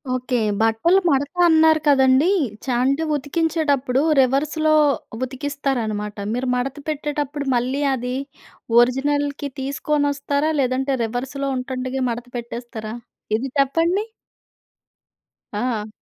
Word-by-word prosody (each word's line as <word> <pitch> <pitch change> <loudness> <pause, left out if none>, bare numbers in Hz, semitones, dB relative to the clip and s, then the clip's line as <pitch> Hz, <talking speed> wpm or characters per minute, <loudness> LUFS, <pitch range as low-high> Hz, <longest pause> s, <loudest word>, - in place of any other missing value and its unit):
Okay. 255 0 -2 0.3
బట్టలు 225 +12 +3
మడత 285 +1 +1 0.2
అన్నారు 320 -1 +5
కదండీ. 270 +3 +5 0.4
చా 255 - -1
అంటే 275 +4 +1
ఉతికించేటప్పుడు 290 -3 0 0.2
రివర్స్‌లో 305 +4 +1 0.5
ఉతికిస్తారనమాట. 255 -6 -3 0.2
మీరు 250 +2 -2
మడత 255 +2 -2
పెట్టేటప్పుడు 290 -1 -3
మళ్ళీ 255 +4 0
అది 250 0 -3 0.6
ఒరిజినల్‌కి 285 +3 +1
తీసుకోనొస్తారా, 285 +2 0
లేదంటే 265 +1 0
రివర్స్‌లో 265 +4 -3
ఉంటుండగే 255 +1 -3
మడత 240 +1 -6
పెట్టేస్తారా? 235 -2 -6 0.4
ఇది 265 +4 -4
చెప్పండి. 330 +9 +2 1.5
ఆ! 215 -1 -2
270 Hz, 95 wpm, -21 LUFS, 250-290 Hz, 1.5 s, అన్నారు